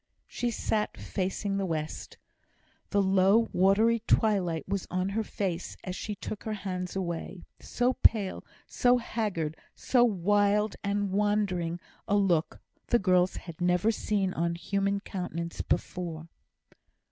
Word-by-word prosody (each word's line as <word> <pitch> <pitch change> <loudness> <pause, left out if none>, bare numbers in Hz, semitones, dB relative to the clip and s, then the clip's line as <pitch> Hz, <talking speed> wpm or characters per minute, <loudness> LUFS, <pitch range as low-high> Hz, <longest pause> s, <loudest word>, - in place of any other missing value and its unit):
She 245 - -2
sat 215 -2 -1
facing 195 +1 -2
the 195 - 0
west. 155 -2 -4 0.7
The 200 0 +2
low 195 +4 +4
watery 210 +5 +4
twilight 190 -7 +2
was 195 -1 -2
on 185 +1 -1
her 220 +3 -1
face 185 -4 -3
as 185 - -4
she 210 +1 -4
took 205 +1 -6
her 220 - -3
hands 180 -1 -3
away. 175 0 -4 0.2
So 245 +1 0
pale, 205 -4 +3 0.2
so 245 0 +3
haggard, 205 -10 -2 0.2
so 245 -2 +3
wild 205 0 +2
and 200 -1 0
wandering 195 -4 0 0.3
a 205 - +2
look 180 -5 +1 0.3
the 240 - +4
girls 185 -3 +3
had 170 -1 -9
never 180 +4 +3
seen 200 -4 -1
on 170 +1 -1
human 200 +3 -1
countenance 170 -4 -4
before. 165 -2 -3
195 Hz, 135 wpm, -29 LUFS, 180-210 Hz, 0.7 s, low